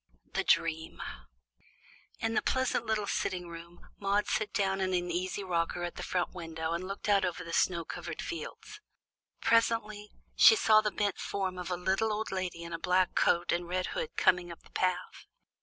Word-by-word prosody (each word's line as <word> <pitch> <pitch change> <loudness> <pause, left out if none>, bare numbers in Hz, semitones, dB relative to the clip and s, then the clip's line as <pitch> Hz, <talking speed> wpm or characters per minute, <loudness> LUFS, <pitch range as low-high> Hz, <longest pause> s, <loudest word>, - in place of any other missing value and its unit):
THE - - +1
DREAM 160 -1 +1 1.2
In 225 0 -1
the - - +2
pleasant 260 -3 0
little 215 -2 0
sitting 180 -2 -2
room 170 +1 -11
Maude 200 +1 +1
sat 215 -1 -1
down 195 -1 0
in 185 -1 +1
an 175 0 -1
easy 185 +3 -2
rocker 175 -1 -1
at 175 - -3
the - - -7
front 180 -1 -1
window 165 -2 -4
and 175 +2 -3
looked 195 +2 -5
out 200 -2 +4
over 180 -1 -2
the 170 -1 -7
snow 170 -2 +2
covered - - -6
fields. 425 0 -6 0.6
Presently 215 -2 +2 0.3
she - - +9
saw 215 - +5
the 215 - 0
bent 205 -1 -1
form 190 -2 -2
of 180 - -5
a 180 - -1
little 190 +5 +1
old 215 +1 -2
lady 185 -3 -3
in 170 0 -7
a 165 - -3
black 180 +1 +2
coat 175 0 +2
and 175 0 -1
red 185 +1 -1
hood - - -4
coming 180 -1 +3
up 170 - -11
the - - -20
path. 185 0 -2
185 Hz, 190 wpm, -31 LUFS, 175-210 Hz, 1.2 s, she